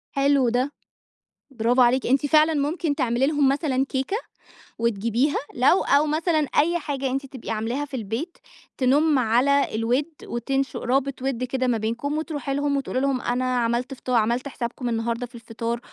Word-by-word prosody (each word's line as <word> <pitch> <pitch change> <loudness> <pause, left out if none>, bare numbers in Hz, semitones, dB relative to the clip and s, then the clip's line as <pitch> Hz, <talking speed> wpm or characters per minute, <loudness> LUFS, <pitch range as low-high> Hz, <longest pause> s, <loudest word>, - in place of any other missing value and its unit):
حلو 275 -3 +3
ده، 255 +4 0 0.8
برافو 245 +1 +2
عليكِ، 245 +2 +3
أنتِ 270 +3 +2
فعلًا 310 +2 +4
ممكن 295 +1 -1
تعملي 255 -1 +1
لهم 290 -3 +3
مثلًا 275 -2 +1
كيكة 270 +10 -2 0.6
وتجيبيها 235 +5 +1 0.2
لو 265 +9 +4
أو 285 +2 +3
مثلًا 315 +2 +1 0.2
أي 340 +3 +2
حاجة 275 -4 -3
أنتِ 270 +1 -2
تبقي 260 -4 -9
عاملاها 230 +6 -2
في 285 - -21
البيت، 235 - -4 0.4
تنُم 285 +3 +3
على 255 +3 +2
الود 240 +6 +1 0.2
وتُنشئ 270 +2 -2
رابط 270 +1 -1
ود 260 -2 -2
كده 255 0 -1
ما 235 -2 +2
بينكم، 235 +7 -2
وتروحي 290 -4 -3
لهم 285 0 0
وتقولي 270 -2 -2
لهم 275 -2 0
أنا 255 +1 0
عملت 235 +3 -1
فط 255 - -10
عملت 240 +2 +1
حسابكم 245 -1 -4
النهارده 230 +1 -1
في 240 0 -16
الفطار. 230 0 -4
265 Hz, 160 wpm, -24 LUFS, 240-285 Hz, 0.8 s, فعلًا